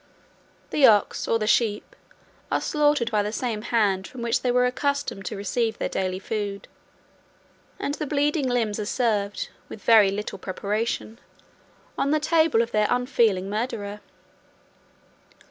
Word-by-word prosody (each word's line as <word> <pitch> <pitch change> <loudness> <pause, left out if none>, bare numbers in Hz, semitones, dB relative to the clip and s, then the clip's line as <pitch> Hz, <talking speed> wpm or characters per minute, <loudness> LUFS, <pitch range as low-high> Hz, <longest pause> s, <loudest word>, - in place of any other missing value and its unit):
The 285 -3 +6
ox, 210 -3 +3
or 230 - +2
the 215 - -2
sheep, 215 -1 +1 0.6
are - - +2
slaughtered 295 -6 +1
by 210 -1 +2
the 205 +1 -2
same 225 -2 -3
hand 205 -5 +1
from 245 -2 -8
which 235 -1 +1
they 250 - 0
were 250 0 +3
accustomed 270 -5 -2
to 215 - -4
receive 220 +3 -1
their - - -2
daily 185 -1 -1
food; 200 0 -4 1.1
and 285 - -3
the 300 0 -4
bleeding 290 0 +1
limbs 225 -4 0
are 210 - -2
served, 210 -5 -1 0.2
with 205 - -10
very 220 -4 +6
little 205 +2 -4
preparation, 215 +4 -3 0.8
on 280 - +1
the 305 +1 +2
table 315 -6 +3
of 230 - -7
their 215 -1 +2
unfeeling 235 -7 +1
murderer. 210 -1 -3
225 Hz, 145 wpm, -25 LUFS, 205-250 Hz, 1.1 s, The